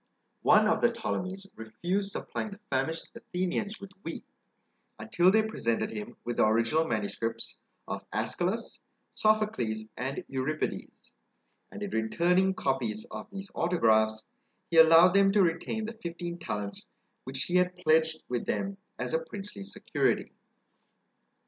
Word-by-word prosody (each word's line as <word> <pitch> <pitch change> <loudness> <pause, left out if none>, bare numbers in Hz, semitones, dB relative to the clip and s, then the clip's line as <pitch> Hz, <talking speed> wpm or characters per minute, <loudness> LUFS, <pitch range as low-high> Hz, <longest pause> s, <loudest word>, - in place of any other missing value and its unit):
One 215 0 +6
of 220 - +2
the 240 - +4
Ptolemies 195 -4 -3
refused 175 - -2
supplying 215 - -4
the 200 0 -10
famished 160 +5 -1
Athenians 185 +4 -3
with 200 -1 -10
wheat, 165 - -6 0.7
until 175 +12 +3
they 220 +3 +5
presented 165 - -1
him 105 -2 -7
with 120 0 -3
the - - +5
original 115 +9 +3
manuscripts 115 0 -3 0.3
of - - -5
Æschylus, 175 - -2 0.3
Sophocles, 125 - +1
and 135 +3 -3
Euripides; 135 +3 -3 0.6
and 210 - -6
in 205 - -4
returning 180 +12 +2
copies 120 - -1
of 110 - -7
these 195 0 -7
autographs, 110 -10 +2 0.5
he 165 - +2
allowed 165 +2 +8
them 195 0 +5
to 205 -2 +5
retain 175 +6 -1
the 225 - -5
fifteen 175 -4 -6
talents 105 - -4 0.4
which 130 +1 -2
he 180 - +1
had 180 0 +2
pledged 160 -1 +2
with 120 -1 -2
them 195 0 -1 0.2
as - - -3
a - - +1
princely 205 - -7
security. 195 - -1
170 Hz, 135 wpm, -29 LUFS, -, 0.7 s, allowed